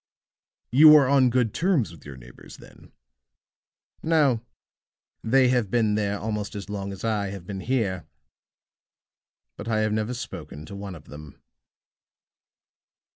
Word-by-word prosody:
You 150 +4 +8
are 140 -3 +6
on 135 -2 +4
good 120 -3 0
terms 165 - +1
with 80 -4 -14
your 70 -2 -9
neighbors, - - -14
then?" - - -17 1.1
"No. 150 -8 +2 0.8
They 130 +2 +3
have 120 -5 +1
been 110 -1 +1
there 105 -1 -1
almost 105 -1 -4
as 100 0 -7
long 100 -1 -4
as 95 - -9
I 105 -3 -1
have 95 -2 -8
been 95 0 -6
here; 100 -6 -2 1.5
but 105 - -8
I 110 -2 +1
have 110 0 0
never 110 +3 -2
spoken 80 -9 -8
to 100 - -10
one 100 -2 -7
of 75 - -14
them." 75 0 -12
110 Hz, 140 wpm, -25 LUFS, 100-125 Hz, 1.5 s, You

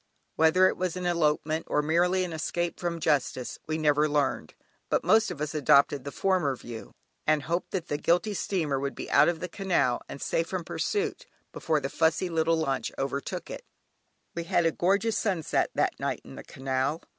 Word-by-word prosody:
Whether 160 +4 +5
it - - -1
was 185 -1 -2
an 180 - -4
elopement 160 -2 0
or 150 - +1
merely 175 +4 +2
an 175 -2 -4
escape 170 +2 -2
from 170 -1 -2
justice 140 -5 0
we 155 0 -1
never 150 -1 +3
learned, 145 - -1 0.3
but - - +1
most 220 0 +4
of 175 -5 -6
us 150 0 -3
adopted 140 -1 +4
the 140 - -4
former 180 -8 +1
view, 120 -2 -10 0.3
and 155 -1 +3
hoped 170 +3 -2
that 185 -3 -3
the 145 - -2
guilty 180 +7 +2
steamer 160 -8 -1
would 140 0 -3
be - - -7
out - - +6
of 170 -2 -3
the 180 - -3
canal 170 -10 0
and - - -7
safe 165 +4 -1
from 185 -1 -3
pursuit, 410 - -2 0.3
before 155 -2 0
the 135 - -3
fussy 160 +5 +1
little 165 0 +1
launch 135 -4 -1
overtook 140 +1 -4
it. - - -7 0.7
We 170 -1 -4
had 175 -1 +2
a 165 - +3
gorgeous 200 +5 +1
sunset 185 -7 0
that - - 0
night - - -2
in - - -11
the - - -9
canal. 135 +4 -2
160 Hz, 190 wpm, -28 LUFS, 145-180 Hz, 0.7 s, out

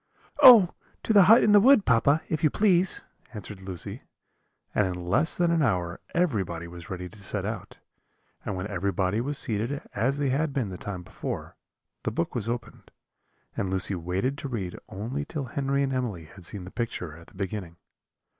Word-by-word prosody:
"Oh! 220 -9 +9 0.3
to 220 - +1
the 200 -3 +8
hut 225 +2 +8
in 210 - +4
the 205 - +8
wood, 245 -1 +6
papa, 140 +6 +3
if 155 -1 -2
you 155 - +5
please," 185 -2 +2 0.3
answered 105 -1 -7
Lucy; 95 -3 -7 0.7
and 105 - +2
in 90 - -2
less 95 - +1
than 175 -1 +2
an 165 -1 +2
hour 90 -9 0 0.2
everybody 95 - 0
was 85 -1 -11
ready 90 -1 -5
to 105 +3 -15
set 100 0 -3
out: 110 -3 -6 0.7
and 100 - -3
when 95 +1 -4
everybody 100 +1 -1
was 140 +3 -2
seated 115 +4 0
as 130 +7 0
they 145 -2 0
had 145 +2 0
been 130 -7 -1
the 90 - -6
time 90 -3 -6
before, - - -6 0.5
the - - -1
book 85 - -2
was 115 -2 -2
opened, 120 0 -6 0.7
and 95 - -2
Lucy 95 +1 0
waited 95 +11 -2
to - - -5
read 100 -8 -4
only 120 +9 -4
till 150 -2 -5
Henry 140 +2 -1
and 135 -1 -1
Emily 115 -11 -3
had 90 +3 -11
seen 95 +1 -5
the 90 - -10
picture 90 -9 -4
at 85 +1 -15
the - - -19
beginning. 95 -3 -5
110 Hz, 190 wpm, -27 LUFS, 95-140 Hz, 0.7 s, Oh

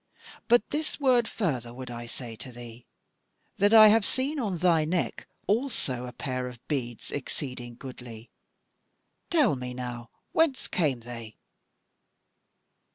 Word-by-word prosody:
But 235 -2 +4
this 305 +1 -2
word 250 -4 +4
further 125 - -2
would 130 -1 -7
I 120 0 -6
say 115 -1 -7
to 120 +4 -7
thee, 120 0 -11 0.7
that 205 +1 +4
I 215 -1 +10
have 220 0 +5
seen 275 +7 0
on 205 -8 -1
thy 165 -2 +4
neck 170 +3 -1 0.2
also 205 - 0
a - - -6
pair 130 -1 -3
of 125 -1 -8
beads 120 -6 -3
exceeding 125 -3 -4
goodly. 120 -3 -10 1.0
Tell 295 - +4
me 125 -1 -5
now 120 -2 -6 0.2
whence 320 -5 +2
came 145 -9 0
they." 115 -2 -9
130 Hz, 135 wpm, -28 LUFS, -, 1.0 s, I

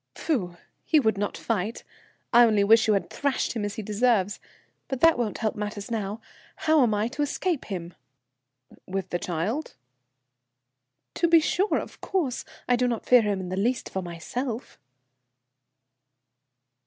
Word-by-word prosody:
"Pfu! 185 - -2 0.3
He 315 - +4
would 220 -6 +2
not 205 +1 -2
fight! 220 0 -2 0.5
I 240 +1 +8
only 215 -3 +3
wish 225 +2 +5
you 215 - +4
had 195 - -2
thrashed 280 -2 -1
him 225 -3 -3
as 205 0 -3
he 220 - -5
deserves. 210 -1 +1 0.5
But 265 - -3
that 330 0 +6
won't 230 -4 -2
help 220 -2 -1
matters 210 +1 -5
now. 215 -1 -3 0.3
How 315 -1 +3
am 240 -4 +3
I 210 +2 +1
to 290 +4 -4
escape 305 +2 -1
him?" 175 -3 -6 0.9
"With 190 0 -4
the 175 - -1
child?" 185 - -3 1.4
"To 340 - +1
be 335 0 +7
sure. 370 +6 +1
Of - - -7
course, 320 -11 -1 0.2
I 245 - +4
do 250 +1 +1
not 235 -2 -2
fear 250 -1 +6
him 205 -3 -1
in 185 -1 -5
the 185 - -2
least 240 +6 -1
for 190 - -2
myself." 220 +8 -5
220 Hz, 160 wpm, -26 LUFS, 200-255 Hz, 1.4 s, I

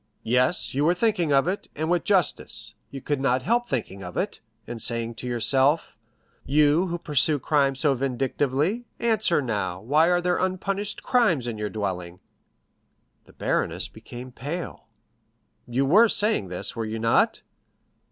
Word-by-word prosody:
"Yes, 125 +8 +1
you 140 +2 +1
were 170 +3 +3
thinking 180 -6 +1
of 140 +3 +3
it, 190 +3 -3
and 155 +2 -2
with 175 0 +1
justice. 190 -6 0 0.2
You 135 - -8
could 145 0 -2
not 130 -1 +1
help 240 +2 +1
thinking 100 - -3
of 90 -1 -7
it, 200 +2 -2 0.3
and 120 -1 -7
saying 115 0 0
to 125 - -7
yourself, 130 +5 +2 0.5
'you, 150 +5 +3
who 175 0 -3
pursue 150 -1 +2
crime 140 0 +1
so 140 +1 +2
vindictively, 135 - -1
answer 215 -9 +1
now, 100 -7 -2
why 150 - +3
are 175 0 +3
there 175 0 0
unpunished 195 +2 -2
crimes 200 - +2
in 115 -3 -4
your 105 -1 -2
dwelling?'" 90 -4 -4 1.1
The - - -19
baroness - - -1
became 125 +1 -10
pale. 150 +9 -6 0.8
"You 125 +3 0
were 215 +11 +6
saying 210 - +1
this, 90 +4 -1
were 115 - -2
you 110 +1 -4
not?" 115 +1 +2
140 Hz, 155 wpm, -25 LUFS, 120-180 Hz, 1.1 s, were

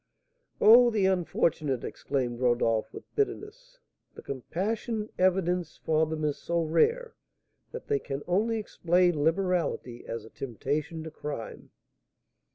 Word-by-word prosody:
"Oh, 240 +3 +8
the 215 -4 +1
unfortunate!" 165 -7 0
exclaimed 125 -4 -3
Rodolph, 120 -3 +1
with - - -12
bitterness. 445 +4 -3 0.4
"The - - -11
compassion 210 - -3
evinced 180 -2 +1
for 160 0 +2
them 155 0 -4
is 145 -1 -1
so 170 0 -1
rare, 465 - +1 0.6
that 475 - -7
they 430 -1 +1
can 135 +1 -5
only 215 +6 +1
explain 175 -6 +1
liberality 165 -8 0
as 115 -1 -5
a 110 - -14
temptation 145 +6 -3
to 160 - -7
crime!" 145 -7 -7
170 Hz, 125 wpm, -28 LUFS, 145-210 Hz, 0.6 s, Oh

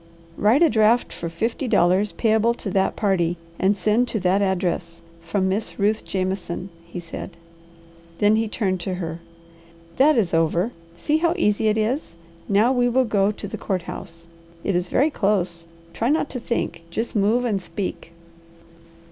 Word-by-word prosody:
"Write 230 - +4
a 330 - +6
draft 220 +2 +3
for 170 - -4
fifty 225 - -2
dollars 190 0 +3
payable 225 +1 +2
to 200 - -5
that 190 0 +1
party, 175 -4 +1 0.2
and 200 +2 +2
send 220 +5 +2
to 225 - -2
that 185 +2 +2
address, 175 -3 -1 0.2
from 190 +3 -1
Miss 200 +3 -2
Ruth 210 +2 +1
Jameson," 185 -1 -3 0.2
he 170 - -6
said. 170 +1 -8 0.8
Then 210 +1 +4
he 225 0 +1
turned 195 -4 -1
to 185 +1 -3
her. 165 -2 -5 0.8
"That 295 +2 +5
is 195 -7 +1
over. 165 +6 +2 0.3
See 295 - +1
how 335 +1 +1
easy 215 - +2
it 215 0 +2
is! 220 - -1 0.3
Now 210 +5 +4
we 245 -1 +2
will 255 +2 +3
go 205 -2 +2
to 205 - -7
the - - -6
court 185 -4 -2
house. 165 -1 -9 0.4
It 200 - 0
is 175 0 0
very 295 +4 +2
close. 180 -7 0 0.3
Try 230 - 0
not 300 0 +1
to 250 - -4
think. 235 -7 -2
Just 225 +8 -3
move 220 +4 +2
and 205 -5 0
speak." 185 -2 -5
200 Hz, 170 wpm, -23 LUFS, 180-230 Hz, 0.8 s, a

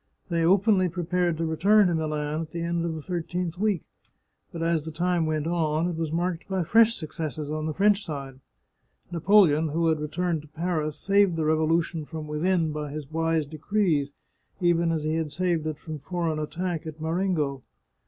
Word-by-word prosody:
They 170 -1 +1
openly 190 +1 +4
pre 175 +1 -4
pared 175 -1 0
to 165 - -1
return 195 +7 +4
to 175 - +2
Milan 155 -1 -1
at 160 - -6
the 170 +1 -4
end 170 0 -1
of 165 -1 -2
the 155 - -7
thirteenth 175 0 -3
week, 205 -6 +1 0.7
but 165 -1 -4
as 165 -2 0
time 175 0 0
went 155 -1 -1
on, 165 -1 +1
it - - -4
was 160 -1 -2
marked 170 +1 -2
by 190 -3 -1
fresh 225 +6 +5
successes 155 -2 -5
on 155 0 -2
the 155 - -2
French 205 +1 +3
side. 135 -4 -6 0.7
Napoleon, 170 -3 +4
who 165 +2 +1
had 160 -1 +1
returned 160 +2 -1
to 155 - -16
Paris, 155 -1 -2
saved 200 -3 +3
the 160 -1 -1
revolution 160 +1 +1
from 155 0 -6
within 160 +2 0
by 150 -1 -4
his 150 0 -7
wise 165 -1 +1
decrees, 155 -1 0 0.5
even 170 -2 +2
as 160 -2 -1
he 155 +1 0
had 160 -2 -2
saved 170 -2 0
it 155 -2 -3
from 155 0 -7
foreign 165 +1 -2
attack 165 +1 -3
at 155 0 -8
Marengo. 160 -4 -1
165 Hz, 185 wpm, -26 LUFS, 155-180 Hz, 0.7 s, fresh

